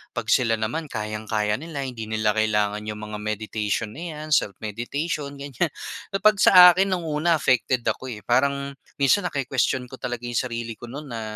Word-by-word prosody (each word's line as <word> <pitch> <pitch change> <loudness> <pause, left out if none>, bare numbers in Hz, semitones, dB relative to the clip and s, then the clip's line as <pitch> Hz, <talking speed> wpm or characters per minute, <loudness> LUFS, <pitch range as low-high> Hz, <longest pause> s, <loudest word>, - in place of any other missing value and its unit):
'pag - - -2
sila 115 -2 +3
naman 120 +9 -3
kayang-kaya 110 -1 -2
nila 155 -3 -5
hindi 120 -4 -6
nila 110 -1 +1
kailangan 105 -1 +1
'yong 105 0 -5
mga 105 - -4
meditation 105 0 -2
na 150 +10 -8
'yan, 155 +1 -7
self-meditation, 140 - -1
ganyan. 140 +3 -2 0.5
Kapag 210 0 +4
sa 180 -2 +9
akin 190 +3 +2
nung 175 - -5
una 160 +2 +1
affected 125 -3 +1
ako 130 - -2
eh, 105 -4 -7
parang 140 +3 +1 0.2
minsan 160 +7 +3
naki-question 130 -3 0
ko 130 - -9
talaga 120 0 -4
'yong 120 -1 -1
sarili 115 -1 -4
ko - - -9
no'n 140 +4 -8
na, 115 -1 -5
120 Hz, 175 wpm, -24 LUFS, 110-145 Hz, 0.5 s, sa